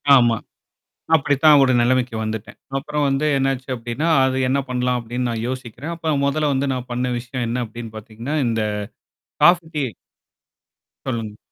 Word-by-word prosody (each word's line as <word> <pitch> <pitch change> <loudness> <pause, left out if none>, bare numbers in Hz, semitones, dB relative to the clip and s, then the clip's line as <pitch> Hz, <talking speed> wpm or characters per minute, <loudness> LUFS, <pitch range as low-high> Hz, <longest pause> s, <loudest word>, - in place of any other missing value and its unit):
ஆமா. 120 -3 +4 0.8
அப்படித்தான் 145 0 +5
ஒரு 130 -1 +4
நிலைமைக்கு 125 0 +2
வந்துட்டேன். 110 -1 -5 0.2
அப்புறம் 150 +2 -1
வந்து 135 +2 +1
என்ன 135 0 +2
ஆச்சு 130 +1 -11
அப்படின்னா, 120 +7 -2 0.2
அது 130 0 +1
என்ன 140 +2 +2
பண்ணலாம் 125 0 0
அப்படின்னு 120 +2 -3
நான் 115 0 -3
யோசிக்கிறேன். 130 +5 -5
அப்ப 160 -2 -1
மொதல்ல 150 +1 +1
வந்து, 135 +1 0
நான் 125 -1 -4
பண்ண 125 +1 -1
விஷயம் 120 0 -4
என்ன 125 +1 -1
அப்படின்னு 115 0 -8
பார்த்தீங்கன்னா, 115 +7 -6
இந்த 115 -1 0 0.8
காபி, 175 -1 +6
டீ 150 - 0
சொல்லுங்க. 130 -6 -2 1.1
சொல்லுங்க. 110 -4 -3
125 Hz, 155 wpm, -21 LUFS, 115-140 Hz, 1.1 s, காபி